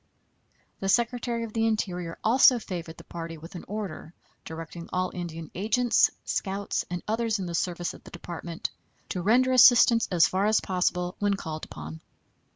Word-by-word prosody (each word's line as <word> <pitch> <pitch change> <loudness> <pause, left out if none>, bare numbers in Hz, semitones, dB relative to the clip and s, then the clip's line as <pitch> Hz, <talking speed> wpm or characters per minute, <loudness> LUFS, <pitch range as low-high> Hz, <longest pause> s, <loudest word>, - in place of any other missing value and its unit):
The 195 - -2
Secretary 235 +1 +1
of 225 -2 -7
the 225 0 +1
Interior 180 -6 -2
also 250 +2 +6
favored 170 -7 -6
the - - -12
party 165 -1 -7
with 165 +5 -11
an 175 - -7
order, 195 -5 -6 0.3
directing 165 +1 -8
all 185 0 -1
Indian 165 -3 -6
agents, 225 +5 +3 0.2
scouts, 200 0 -2
and 175 -1 -4
others 225 0 0
in 190 - -4
the 170 - -5
service 175 0 -2
of - - -14
the - - -12
Department 170 -1 -6 0.4
to 180 - -2
render 245 +7 +3
assistance 240 -2 +7
as 175 -3 +5
far 195 +2 +1
as 215 0 +4
possible 180 -1 -1
when 205 -1 +2
called 155 -4 -6
upon. 80 +1 -9
185 Hz, 165 wpm, -27 LUFS, 170-225 Hz, 0.4 s, assistance